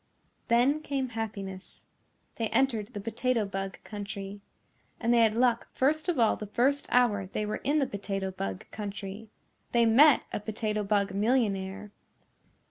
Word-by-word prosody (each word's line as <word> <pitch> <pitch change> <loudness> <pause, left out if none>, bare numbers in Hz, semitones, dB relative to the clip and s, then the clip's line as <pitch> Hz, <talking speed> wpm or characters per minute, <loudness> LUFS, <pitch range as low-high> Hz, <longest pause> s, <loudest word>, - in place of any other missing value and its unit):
Then 255 +6 +3
came 275 -3 -2
happiness. 200 -4 -6 0.5
They 225 - 0
entered 230 -4 +1
the - - -3
Potato 230 +2 0
Bug 195 -1 -4
Country. 200 -1 -7 0.6
And 235 0 +2
they 240 - +5
had 225 -1 +4
luck 240 -1 +2
first 310 +6 +1
of 345 - +1
all 230 -3 +4
the 210 - -7
first 270 +7 +1
hour 210 -6 +3
they 210 +3 -3
were 210 - -2
in 290 +2 0
the 285 - +3
Potato 195 -3 -3
Bug 95 - -5
Country. 205 0 -6 0.4
They 235 -1 +5
met 265 +6 +6
a - - -1
Potato 215 0 -2
Bug 200 -1 +1
millionaire. 205 -2 0
215 Hz, 150 wpm, -29 LUFS, 200-245 Hz, 0.6 s, met